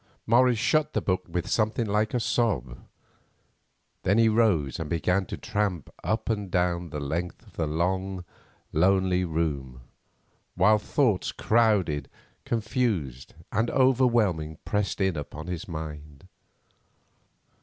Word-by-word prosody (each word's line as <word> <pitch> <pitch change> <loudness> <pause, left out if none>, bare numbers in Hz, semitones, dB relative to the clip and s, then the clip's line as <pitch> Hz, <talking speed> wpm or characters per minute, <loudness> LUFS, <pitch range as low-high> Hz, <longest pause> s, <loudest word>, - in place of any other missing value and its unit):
Morris 120 +1 +4
shut 155 +6 +1
the - - +1
book 90 -1 -1
with 90 0 -2
something 110 +1 +1
like 105 +2 0
a - - +2
sob. 85 - 0 1.2
Then 100 +3 +2
he 115 -1 +5
rose 100 - +2
and 80 -2 -4
began 90 +3 0
to - - -5
tramp 100 -8 -2
up 110 +7 -1
and 105 -4 -1
down 90 -1 0
the 75 - -5
length 80 +5 -4
of - - -19
the 80 - -1
long, 95 +3 -1 0.5
lonely 95 +2 +3
room, 75 -7 -2 0.7
while 105 +4 +4
thoughts, 110 -3 +1
crowded, 100 - +1 0.4
confused, 105 - -2 0.2
and 115 +2 +1
overwhelming, 120 - +2
pressed 105 0 -1
in 95 -3 +1
upon 75 +1 -6
his 90 -1 -5
mind. 75 -4 -8
95 Hz, 125 wpm, -27 LUFS, 80-110 Hz, 1.2 s, he